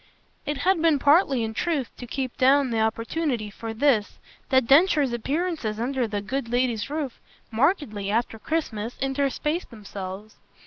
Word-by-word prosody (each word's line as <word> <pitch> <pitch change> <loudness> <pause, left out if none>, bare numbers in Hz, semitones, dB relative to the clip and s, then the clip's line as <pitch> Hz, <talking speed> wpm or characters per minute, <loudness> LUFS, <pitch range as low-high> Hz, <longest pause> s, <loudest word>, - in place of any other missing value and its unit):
It 295 0 -1
had 370 +2 +2
been 325 -3 +4
partly 280 -3 +4
in 220 0 -3
truth 295 -1 -1
to 245 - -8
keep 260 0 -3
down 270 0 +4
the 225 - 0
opportunity 230 +1 -1
for 225 +2 -6
this 225 -3 +1 0.3
that 260 -2 +4
Densher's 285 -1 +4
appearances 275 -3 -2
under 250 0 0
the 205 -1 -3
good 245 +3 -3
lady's 245 -2 0
roof 290 -4 -4 0.3
markedly, 230 - 0
after 225 +1 -1
Christmas, 235 -7 -3
interspaced 280 +5 -1
themselves. 205 -2 -8
255 Hz, 145 wpm, -25 LUFS, 220-290 Hz, 0.3 s, been